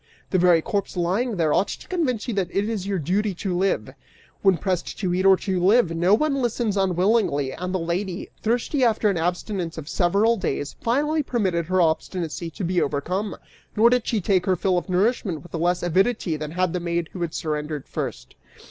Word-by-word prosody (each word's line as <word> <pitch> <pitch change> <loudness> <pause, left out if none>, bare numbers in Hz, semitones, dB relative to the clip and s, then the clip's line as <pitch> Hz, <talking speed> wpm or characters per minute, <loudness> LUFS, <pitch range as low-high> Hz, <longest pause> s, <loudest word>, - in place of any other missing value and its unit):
The 185 - +3
very 170 -2 +4
corpse 200 -2 -2
lying 200 +7 0
there 160 -3 +2
ought 200 - +2
to - - -7
convince 265 - -1
you 240 - -1
that 195 -3 0
your 200 -1 -1
duty 195 +6 0
is - - -15
to 190 -3 -1
live!' 190 +2 0 0.5
When 190 -3 +4
pressed 180 +1 -2
to 185 -4 -1
eat 185 +2 +2
or 190 -1 +7
to 185 -3 -2
live, 195 -3 +4
no 175 +5 +4
one 275 +1 0
listens 235 -3 0
unwillingly, 185 - +1
and 180 +1 -4
the 190 - 0
lady, 175 +2 -3
thirsty 245 +5 0
after 220 -3 +3
an 190 - -2
abstinence 175 0 -2
of 155 -2 -7
several 200 +7 +2
days, 145 -6 -3
finally 295 +6 +1
permitted 190 - -1
her 185 0 +2
obstinacy 165 0 -1
to 195 - -7
be 175 0 +1
overcome; 180 +9 -2 0.4
nor 230 +3 +5
did 250 -2 +1
she 225 - +1
take 185 0 +1
her 185 - +3
fill 180 0 +1
of 180 - -13
nourishment 185 - 0
with 175 - -15
less 175 +2 0
avidity 185 0 +1
than 150 0 -5
had 180 +1 0
the 180 - -1
maid 170 -1 -2
who 180 - -6
had 170 -2 -3
surrendered 150 -2 -3
first." - - -5
185 Hz, 200 wpm, -24 LUFS, 170-210 Hz, 0.5 s, or